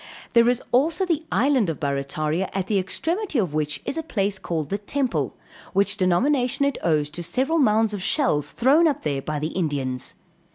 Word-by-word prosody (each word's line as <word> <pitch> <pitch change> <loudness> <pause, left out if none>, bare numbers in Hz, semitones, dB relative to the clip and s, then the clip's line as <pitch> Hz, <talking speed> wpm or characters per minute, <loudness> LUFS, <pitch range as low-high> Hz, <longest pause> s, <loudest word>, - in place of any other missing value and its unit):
There 235 -1 +5
is 245 0 0
also 315 +9 +2
the 330 -3 0
island 260 -6 +2
of 160 - -4
Barrataria, 150 +4 -1
at 195 -2 -1
the 200 0 +1
extremity 330 - -2
of 185 -9 0
which 150 -1 -1
is 325 - -1
a - - -1
place 200 -10 -1
called 160 -5 -3
the 200 - -1
Temple, 255 +4 -2 0.4
which 200 +1 +3
denomination 250 - +2
it 280 -2 -1
owes 150 -3 +1
to 175 - -6
several 265 - 0
mounds 220 -4 +3
of 200 - -4
shells 180 - +1
thrown 290 +7 +4
up 295 - -1
there 140 -3 -1
by 150 +2 -3
the 150 +2 -2
Indians. 140 -8 -2
200 Hz, 190 wpm, -23 LUFS, -, 0.4 s, There